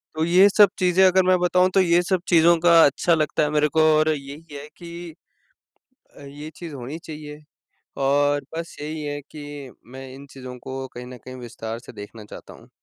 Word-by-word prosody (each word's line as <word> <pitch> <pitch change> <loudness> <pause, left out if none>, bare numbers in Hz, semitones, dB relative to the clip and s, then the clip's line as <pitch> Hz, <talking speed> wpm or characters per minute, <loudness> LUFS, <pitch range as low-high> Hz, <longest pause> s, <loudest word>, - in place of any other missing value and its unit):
तो 160 +1 0
ये 185 +4 +5
सब 205 -2 +8
चीज़ें 185 +1 +4
अगर 185 0 +3
मैं 185 -1 +4
बताऊँ 180 +1 +2
तो 195 - +6
ये 175 -1 +3
सब 185 0 -1
चीज़ों 170 0 +5
का 165 -1 +7
अच्छा 170 +4 +2
लगता 155 -1 0
है 150 - 0
मेरे 150 0 +2
को 160 - +6 0.2
और 155 0 +2
यही 145 +2 -11
है 140 +1 -8
कि 170 -1 -9 1.0
अ, - - -13
ये 145 +2 -9
चीज़ 165 -4 -9
होनी 135 +5 -7
चाहिए 150 -1 -9 0.6
और 145 +1 +2
बस 165 0 -6
यही 155 +1 -5
है 145 0 -4
कि 145 -3 -9 0.2
मैं 135 0 -9
इन 140 +1 -12
चीज़ों 130 -1 -10
को 135 0 -6
कहीं 125 0 -8
न 125 0 -10
कहीं 130 0 -9
विस्तार 115 -1 -7
से - - -14
देखना 105 +2 -10
चाहता - - -12
हूँ। - - -17
150 Hz, 200 wpm, -23 LUFS, 140-170 Hz, 1.0 s, सब